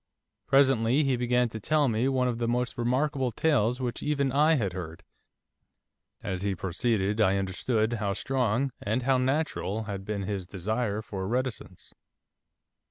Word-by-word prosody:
Presently 135 -1 +4
he 135 -2 +2
began 125 0 +2
to 110 - -6
tell 150 +6 +2
me 115 +2 +1
one 130 -2 +1
of 120 -2 -2
the 120 - 0
most 125 +1 -1
remarkable 130 +2 0
tales 125 -2 +1
which 125 -2 -3
even 140 -2 0
I 150 +4 +4
had 100 - -1
heard. 90 -1 -7 1.2
As 95 -1 -3
he 100 -1 -1
proceeded 100 +3 0
I 100 -2 +3
understood 110 +4 0
how 105 -3 -1
strong, 130 +3 0
and 110 +5 -1
how 130 0 +3
natural, 130 -6 -1
had 100 -2 -5
been 100 0 -3
his 95 -2 -4
desire 105 +3 -2
for 95 -3 -5
reticence. 125 -5 -4
120 Hz, 155 wpm, -28 LUFS, 100-130 Hz, 1.2 s, Presently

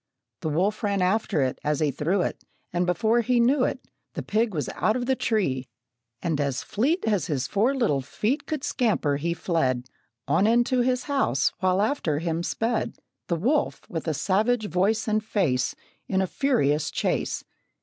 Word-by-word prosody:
The 160 - -2
wolf 185 +8 0
ran 200 -3 +1
after 185 -6 +1
it 130 - -2
as 150 -1 0
he 150 -2 +2
threw 175 +8 0
it, - - -4 0.3
And, 175 0 +1
before 220 +7 +2
he 245 +1 +2
knew 255 +3 +4
it, - - -2 0.3
The - - -3
pig 220 +1 +1
was 155 -6 -2
out 215 - 0
of 250 -1 -1
the 265 +1 +2
tree, 140 - 0 0.6
and 160 -4 0
as 140 -2 -1
fleet 290 - 0
As 210 -5 +1
his 140 -6 -1
four 225 - +1
little 210 - +1
feet 215 - -2
Could 305 -3 -3
scamper 220 - +1
he 170 +4 -1
fled, 130 -9 0 0.4
On, 200 - +3
into 240 +3 +3
his 250 0 +1
house, 270 - +1
while 185 +1 +2
after 210 - 0
him 165 +1 -1
sped 225 +6 -1 0.3
The 170 - +1
wolf, 255 - 0
with 165 -1 -4
a 155 - 0
savage 215 - +1
voice 200 +7 +1
and 215 0 +1
face, 155 - 0 0.3
In 190 - +1
a 190 - +2
furious 155 - +1
chase. - - -1
195 Hz, 180 wpm, -26 LUFS, 155-235 Hz, 0.6 s, knew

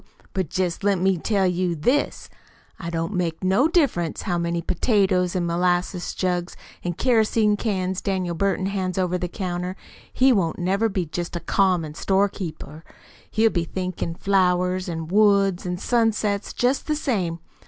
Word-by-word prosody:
But 185 -6 -1
jest 185 0 -2
let 200 -1 +3
me 185 0 +1
tell 200 +1 +1
you 180 -1 0
this: 250 - 0 0.6
it 170 - -3
don't 165 +3 -2
make 175 -2 -2
no 195 +10 +3
difference 280 - +1
how 175 -4 -1
many 170 0 -1
potatoes 185 0 +1
an' 180 -1 0
molasses 175 +1 0
jugs 180 -1 -2 0.3
an' 175 - -2
kerosene 220 -1 +2
cans 190 -3 -2
Daniel 185 -3 -1
Burton 190 +1 0
hands 190 -2 -2
over 180 -1 0
the 180 - -2
counter 180 0 -4 0.4
he 260 0 +4
won't 175 -7 0
never 195 +5 +1
be 190 -3 -1
jest 175 +3 -5
a - - -1
common 180 -5 +1
storekeeper. 175 -4 -2 0.5
He'll 225 0 +3
be 175 - 0
THINKIN' 180 -2 -3
flowers 185 -1 +1
an' 165 -1 -4
woods 200 -1 +3
an' 180 0 -2
sunsets 215 -2 0
jest 250 +3 0
the 305 - +1
same. 195 - -1
185 Hz, 155 wpm, -23 LUFS, 175-200 Hz, 0.6 s, he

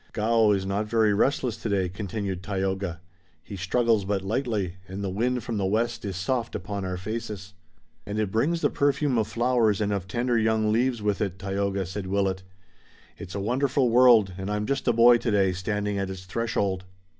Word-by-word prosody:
"Gaoh 110 0 +3
is 95 -1 -1
not 100 +2 -1
very 110 -1 +3
restless 125 +2 +1
today," 100 -4 0
continued 95 0 -4
Tayoga. 95 -3 -2 0.4
"He 100 - -8
struggles 110 +3 +1
but 95 0 -1
lightly, 105 -4 -2
and 95 +2 -6
the 95 - -2
wind 125 +5 0
from 115 - -3
the 100 - 0
west 115 +3 0
is 95 -2 -3
soft 120 +4 -2
upon 100 +1 -4
our 90 -1 -3
faces." 105 -1 -6 0.5
"And 105 +1 -5
it 105 -3 -1
brings 160 +10 +1
the - - +2
perfume 140 -3 +1
of 110 - 0
flowers 120 -4 +2
and 105 -1 0
of 95 -2 -3
tender 120 +4 0
young 110 -1 +2
leaves 120 0 +1
with 105 -1 0
it, 95 -3 -2
Tayoga," 100 0 -2
said 95 +2 -5
Willet. 95 -1 0 0.8
"It's 95 +1 -8
a - - -2
wonderful 125 +4 +1
world 115 -6 +6
and 95 +1 -4
I'm 105 0 -1
just 135 +3 -2
a - - +6
boy 120 +1 +6
today, 100 -5 +2
standing 105 +2 -2
at 95 -1 -2
its 95 -1 -7
threshold." 100 -3 -1
105 Hz, 190 wpm, -26 LUFS, 95-115 Hz, 0.8 s, world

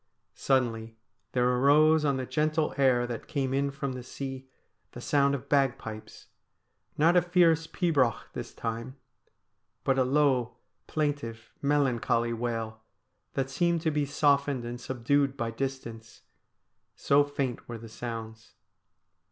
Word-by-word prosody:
Suddenly 115 -4 0 0.4
there 125 -1 +2
arose 150 +5 +4
on 140 -2 +1
the 130 - -3
gentle 155 +4 0
air 130 -3 +3
that 120 -1 -6
came 135 -4 -1
in 140 +1 +1
from 140 -1 -4
the 130 0 -6
sea 130 +1 -7 0.4
the - - -8
sound 140 +2 +2
of 140 0 -7
bagpipes 130 -6 -1 0.4
— - - -50 0.3
not 165 +4 +4
a 180 - +6
fierce 170 -2 +3
pibroch 145 -12 +1
this - - -6
time, 115 +3 -5 0.9
but 135 0 +2
a - - +5
low, 130 -2 +2 0.3
plaintive, 140 -7 -3
melancholy 125 -5 +1
wail, 115 -2 -3 0.5
that 135 0 -1
seemed 170 +4 +1
to 160 -1 +1
be 145 -1 0
softened 140 -3 +2
and 120 +1 -6
subdued 135 +3 0
by 115 -1 -2
distance, 115 -3 -6 0.7
so 140 +1 +4
faint 140 -5 -4
were 120 - -5
the 115 +1 -10
sounds. 115 -1 -7
135 Hz, 135 wpm, -28 LUFS, 120-145 Hz, 0.9 s, a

